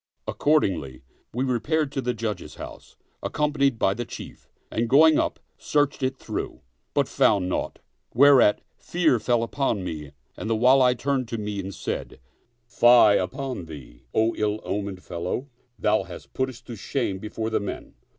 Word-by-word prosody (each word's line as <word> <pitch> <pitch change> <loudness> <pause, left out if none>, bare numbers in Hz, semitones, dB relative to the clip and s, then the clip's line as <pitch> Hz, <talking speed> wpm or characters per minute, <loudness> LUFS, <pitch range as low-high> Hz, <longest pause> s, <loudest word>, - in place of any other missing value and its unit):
" - - -52
Accordingly 90 - 0 0.3
we 125 +3 -1
re 125 -3 0
paired 155 +1 0
to 135 - -2
the 125 -1 -1
Judge's 105 -5 -4
house, - - -10 0.3
accompanied 140 -4 +1
by 95 - +2
the 120 - -4
Chief, - - -10 0.2
and 115 0 -1
going 155 +4 +6
up, - - -1 0.2
searched 145 -1 +1
it 130 0 -1
through, - - -5 0.3
but - - +2
found 100 -4 +2
naught; 90 - -2 0.3
whereat 130 -4 +6 0.2
fear 160 -8 +2
fell 120 0 +1
upon 115 -5 -1
me 75 -5 -6 0.2
and 110 - -5
the 115 - +2
Wali 125 +2 +5
turned 135 -1 -1
to 115 - -4
me 105 -1 -4
and 95 0 -5
said, - - -5 0.3
" 120 0 -45
Fie 120 -3 +8
upon 130 0 -3
thee, 70 -7 -11
O 110 +1 +2
ill 105 0 0
omened 100 -2 -4
fellow 85 +6 -3
I - - -18 0.3
thou 105 0 +2
hast 85 -1 -11
put 130 0 0
us 130 -1 -11
to 120 -1 -9
shame 100 -2 -2
before 110 +2 -4
the 110 - +2
men." 100 - -6
115 Hz, 175 wpm, -25 LUFS, 100-135 Hz, 0.3 s, Fie